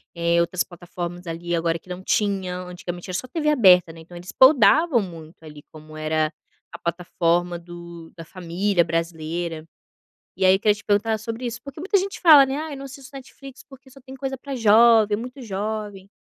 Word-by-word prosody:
eh, 170 0 +2
outras 170 +1 -1
plataformas, 175 0 -8
ali, 170 +1 -3
agora 165 0 -1
que 185 - -23
não 180 +1 -7
tinham? 185 -4 -1
Antigamente 175 0 -8
era 180 - -2
só 255 - -6
TV 300 +3 -1
aberta, 185 - +5
né, 165 - -13
então 175 +2 -13
eles 180 +2 -9
podavam 275 +1 +5
muito, 165 -4 -11
ali, 150 -2 -12
como 155 0 -13
era 155 0 -1 0.4
a - - -10
plataforma 175 0 -1
do 170 -1 -11
da 165 - -9
família 180 +1 -1
brasileira. 165 0 -4 0.7
E 190 - -1
aí 185 - +6
eu 195 - -10
queria 210 -2 +3
te 210 - -14
perguntar 215 +2 +1
sobre 230 +3 -6
isso, 230 -1 -5
porque 280 +1 -11
muita 390 +4 +1
gente 390 +1 -5
fala, 305 -6 +8
né: 265 +1 -3
"Ai, 310 -1 -5
não 275 - -8
assisto 270 +1 -12
Netflix, 275 +1 -12
porque 270 -1 -16
só 275 +1 -16
tem 265 +1 -12
coisa 270 0 -4
para 275 +1 -7
jovem, 220 -1 +5
muito 250 +5 -8
jovem". 205 -1 -5
185 Hz, 190 wpm, -23 LUFS, 170-250 Hz, 0.7 s, fala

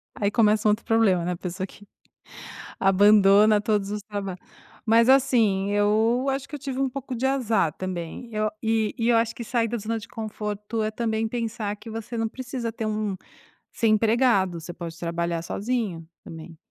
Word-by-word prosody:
Aí 200 -1 0
começa 215 -1 +3
um - - +6
outro 215 +2 -2
problema, 210 -6 +3
né, 180 - -1
a 175 - -3
pessoa 185 +1 -4
que 205 +1 -16 0.9
abandona 205 +2 +5
todos 205 -2 0
os 210 0 -3
traba 200 -3 -5 0.5
Mas, 230 +2 +5
assim, 225 -8 +3
eu 220 +5 +2
acho 270 +1 -3
que 300 - -9
eu - - -4
tive 270 -1 -5
um 270 - +2
pouco 260 0 -6
de 255 +3 -1
azar 230 - +1
também, 185 +5 -6
eu 215 0 0
e 220 -1 0
e 230 +1 +1
eu 235 - +5
acho 230 0 +1
que 235 - -7
sair 230 -1 0
da 240 - -2
zona 225 +2 -3
de 225 +2 -11
conforto, 215 -1 -4
é 215 - -1
também 220 0 -1
pensar 220 -3 -3
que 225 - -11
você 225 +1 -6
não 225 0 0
precisa 245 -2 -5
ter 220 -1 -4
um 215 -2 -2 0.6
ser 225 - +1
empregado, 215 -5 +2
você 175 +2 -8
pode 165 -1 -8
trabalhar 170 -1 -2
sozinho 205 -5 -3 0.2
também, 165 0 -10
215 Hz, 185 wpm, -25 LUFS, 195-230 Hz, 0.9 s, um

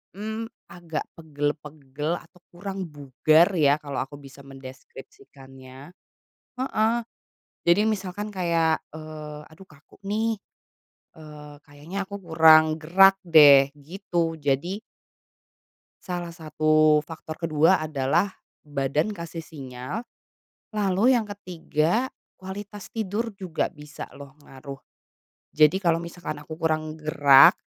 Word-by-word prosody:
Mmm, 220 +2 -4 0.2
agak 165 -3 -6
pegel-pegel 150 -1 -4
atau 180 - -21
kurang 190 +2 -6
bugar 150 +4 +3
ya, 150 -4 +4
kalau 145 -2 -5
aku 145 +2 -12
bisa 140 0 -14
mendeskripsikannya. 135 - -13 0.6
Heeh. 235 -4 +1 0.8
Jadi 170 +4 +5
misalkan 205 -1 -2
kayak, 170 -3 +1
eee, 155 -1 -8
aduh 170 +5 -16
kaku 155 -1 -20
nih, 220 0 -1 0.7
eee, 150 -2 -12
kayaknya 150 +6 -10
aku 200 +1 -8
kurang 160 -1 +7
gerak 185 +5 +5
deh, 145 -5 +7
gitu. 170 +1 -2
Jadi 150 +9 0 1.2
salah 175 -2 -5
satu 155 -1 +3
faktor 160 -1 -8
ke-2 165 +2 +3
adalah 155 +5 0 0.3
badan 145 +6 -1
kasih 170 -3 -7
sinyal, 130 - -7 0.7
lalu 205 +2 +2
yang 215 - -5
ke-3 185 - -1 0.3
kualitas 200 +2 -8
tidur 220 0 -3
juga 185 -5 -2
bisa 150 -2 -10
loh, 140 +1 -13
ngaruh, 135 -1 -11 0.7
Jadi 155 +3 +5
kalau 170 -3 +1
misalkan 170 -3 -7
aku 155 +1 -9
kurang 155 -1 -1
gerak, 145 -3 +6
160 Hz, 110 wpm, -25 LUFS, 145-190 Hz, 1.2 s, kurang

